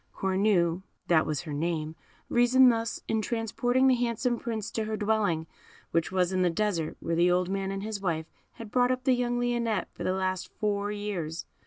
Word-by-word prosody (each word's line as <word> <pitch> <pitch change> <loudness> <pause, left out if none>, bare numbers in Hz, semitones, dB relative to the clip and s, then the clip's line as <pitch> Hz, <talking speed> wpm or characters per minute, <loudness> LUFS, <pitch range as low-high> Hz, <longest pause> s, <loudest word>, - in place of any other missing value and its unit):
Cornue 190 -3 +2 0.3
(that 160 -2 +4
was 150 -3 -1
her 155 -4 -6
name) 155 0 -2 0.3
reasoned 250 +1 +5
thus 230 0 -3
in 220 -1 +1
transporting 245 +3 0
the 265 - +6
handsome 240 0 0
Prince 220 -3 -4
to 220 - -2
her 215 0 -3
dwelling, 205 -7 +1 0.5
which 165 +2 0
was 185 -1 +1
in 185 - +1
the 180 - +3
Desert 170 -3 -1
where 165 - -2
the 175 +2 +4
old 180 0 +2
man 195 0 -2
and 195 0 -4
his 215 -2 -4
wife 165 -4 -1 0.3
had 225 -2 -10
brought 245 -1 +3
up 255 0 -1
the 260 - +4
young 245 -1 0
Lionette 240 -3 0
for - - -7
the 185 - +1
last 185 -1 -2
four 205 -1 -1
years. 190 -6 -4
205 Hz, 195 wpm, -28 LUFS, 175-235 Hz, 0.5 s, the